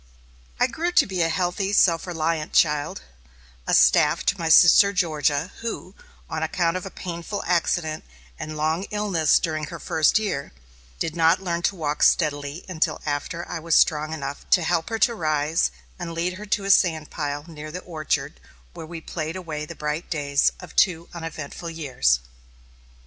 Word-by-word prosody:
I - - +5
grew 345 +2 -2
to - - +5
be 185 -2 -2
a 165 - +2
healthy, 185 +3 -1
self 170 -3 +3
reliant 160 -2 -2
child, 150 -2 +2 0.6
a - - +3
staff - - +4
to - - +2
my 165 -1 -1
sister 185 +5 +7
Georgia, 155 -1 0
who, 230 0 -5 0.3
on - - -4
account 170 -2 0
of 185 +1 -4
a - - -6
painful 180 +2 -6
accident 170 -2 0 0.4
and 155 0 -6
long 160 +5 0
illness 200 -7 +2
during 155 -2 -2
her - - -8
first 160 +3 +2
year, 195 - -3 0.4
did 160 - -3
not 165 -1 +4
learn 170 -2 -1
to 200 - -11
walk 150 -4 -3
steadily 145 0 +1
until 160 -3 -1
after 150 +4 -3
I 175 - -4
was 165 0 +1
strong 155 0 +3
enough 140 -3 -5
to 175 - +4
help 165 0 0
her 225 - -2
to 235 - +3
rise, 155 - +1 0.3
and 170 - -5
lead 170 +2 -1
her 210 - -8
to 200 0 0
a 200 - +3
sand 160 -6 +3
pile 145 -1 -4
near 155 -2 -9
the 180 - -6
orchard, 155 - -3 0.3
where 160 - -9
we 165 0 -7
played 160 0 -5
away 155 -5 -5
the - - -8
bright 150 +2 -4
days 140 -3 +1
of - - -12
two 170 -4 +2
uneventful 165 -1 -6
years. 130 - +1
165 Hz, 175 wpm, -24 LUFS, 155-180 Hz, 0.6 s, sister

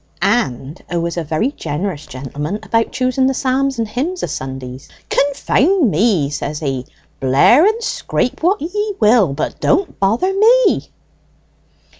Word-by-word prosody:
"And 155 - -1
'a 175 - -1
was 170 0 -2
a 170 - -2
very 160 - -1
jinerous 160 - -4
gentleman 145 +8 -5
about 225 0 0
choosing 255 +1 +1
the 265 - 0
psalms 270 +1 0
and 225 -1 -1
hymns 295 - -3
o' - - +2
Sundays. 130 -1 -7 0.2
'Confound 285 - +2
ye,' 180 -7 +2
says 150 +1 -4
he, 135 -4 -3 0.3
'blare 140 - +5
and 445 +2 0
scrape 250 - -2
what 365 +5 +2
ye 415 +6 -3
will, 215 - +4
but 145 - -4
don't 360 +5 0
bother 225 - +1
me!'" 460 +5 +3
225 Hz, 145 wpm, -17 LUFS, -, 0.3 s, blare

